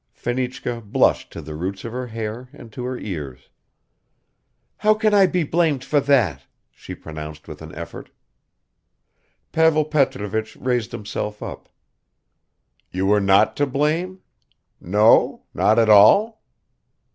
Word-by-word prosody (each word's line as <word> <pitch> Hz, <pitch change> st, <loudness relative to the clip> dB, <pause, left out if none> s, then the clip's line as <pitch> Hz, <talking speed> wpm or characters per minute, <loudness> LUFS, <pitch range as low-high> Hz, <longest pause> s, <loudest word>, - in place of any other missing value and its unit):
Fenichka 125 Hz, -1 st, -3 dB
blushed 105 Hz, -2 st, +1 dB
to -, -, -8 dB
the 75 Hz, -, -8 dB
roots 95 Hz, +6 st, -5 dB
of 115 Hz, -, -5 dB
her 125 Hz, +1 st, -5 dB
hair 115 Hz, +2 st, -6 dB
and 120 Hz, -6 st, -13 dB
to 125 Hz, -, -6 dB
her 125 Hz, 0 st, -4 dB
ears. 75 Hz, -, -7 dB, 1.3 s
"How 215 Hz, 0 st, +3 dB
can 215 Hz, -1 st, +1 dB
I 195 Hz, -2 st, +6 dB
be 180 Hz, -2 st, 0 dB
blamed 155 Hz, -4 st, 0 dB
for 145 Hz, +2 st, +1 dB
that?" 125 Hz, -, +2 dB, 0.3 s
she -, -, -10 dB
pronounced 75 Hz, -1 st, -9 dB
with -, -, -10 dB
an -, -, -10 dB
effort. -, -, -9 dB, 1.4 s
Pavel 160 Hz, -1 st, +3 dB
Petrovich 110 Hz, -8 st, -1 dB
raised 125 Hz, -3 st, -1 dB
himself 105 Hz, 0 st, -5 dB
up. -, -, -9 dB, 1.2 s
"You 95 Hz, +1 st, -2 dB
were 105 Hz, +1 st, +3 dB
not 100 Hz, +2 st, +3 dB
to 145 Hz, -, +1 dB
blame? 160 Hz, +7 st, -1 dB, 0.6 s
No? 105 Hz, +5 st, +3 dB
Not 110 Hz, -, +2 dB
at 115 Hz, -1 st, +4 dB
all?" 200 Hz, -, +5 dB
120 Hz, 135 wpm, -21 LUFS, 105-145 Hz, 1.4 s, I